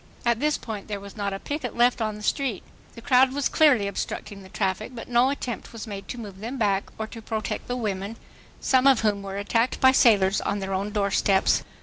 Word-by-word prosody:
At 235 -1 +2
this 300 +2 +1
point 215 -3 -7
there 205 -2 -4
was 200 0 -11
not 200 -2 -2
a 195 - -3
picket 280 +3 -4
left 240 0 +3
on 215 -1 -1
the 210 - -10
street. 250 - -1 0.3
The 230 - -11
crowd 260 +1 +4
was 285 0 +1
clearly 265 -10 +4
obstructing 200 0 -5
the 190 - -13
traffic, 200 +5 -2
but 230 - -7
no 245 +2 +3
attempt 255 -4 -4
was 230 -1 -7
made 200 -3 -7
to 245 - -6
move 205 -5 -8
them 235 +6 -5
back 200 -4 0
or 220 - -3
to 225 +1 -10
protect 220 -1 -4
the 245 0 -2
women, 205 -2 -3 0.4
some 260 0 +3
of 265 -4 +5
whom 210 -2 +1
were 195 0 -6
attacked 230 +4 0
by 260 - +7
sailors 205 -7 +4
on - - -1
their 195 -1 -3
own 195 +2 -1
doorsteps. 200 -1 +2
220 Hz, 225 wpm, -25 LUFS, 200-245 Hz, 0.4 s, by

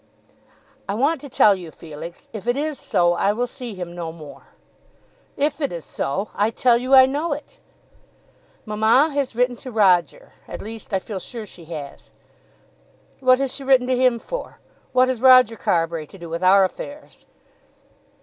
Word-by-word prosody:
"I 200 - -1
want 280 +6 +1
to 285 - -9
tell 210 -4 +5
you, 180 -4 -7
Felix. 160 +2 -10
If 215 0 -8
it 245 +2 +1
is 300 -1 -2
so, 175 -5 +2
I 200 +3 +1
will 240 +3 -1
see 245 -3 -8
him 175 -2 -7
no 170 -2 -5
more." 155 -3 -13 0.9
"If 295 +2 0
it 285 - -1
is 170 -2 -6
so! 195 +10 -3
I 210 +2 +1
tell 240 +1 +3
you 255 +3 +3
I 260 0 +9
know 290 +4 -1
it." 300 - -10 1.1
"Mamma 220 +8 +3
has 275 -4 -2
written 250 +1 +1
to 255 - -9
Roger. 210 - +2 0.2
At - - -7
least 220 +1 -8
I 195 - +2
feel 190 +1 -6
sure 225 +4 -8
she 175 -4 -14
has." 150 -4 -9 1.1
"What 255 -1 +4
has 270 -1 -2
she 275 - -6
written 265 -2 +4
to 255 0 +1
him 250 -1 +3
for? - - -7 0.3
What 255 0 +4
has 255 -3 -2
Roger 255 -3 +6
Carbury 165 -5 -1
to 195 - -14
do 170 -2 -10
with 170 +1 -3
our 190 +1 +6
affairs?" 285 +10 -7
230 Hz, 180 wpm, -22 LUFS, 185-260 Hz, 1.1 s, I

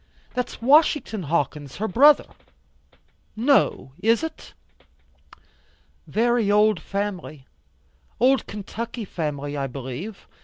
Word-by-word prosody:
That's 250 -2 -4
Washington 290 -5 +3
Hawkins 150 -3 -2
her 220 - -2
brother." 285 +9 +5 1.1
"No, 245 - +2
is 225 +7 +2
it?" 320 - -7 1.5
"Very 235 -1 +1
old 210 -2 +4
family, 185 -7 -5 0.7
old 260 +3 +3
Kentucky 225 +3 -6
family 145 -5 -4
I 140 -1 -2
believe. 135 - -7
210 Hz, 90 wpm, -23 LUFS, 155-240 Hz, 1.5 s, brother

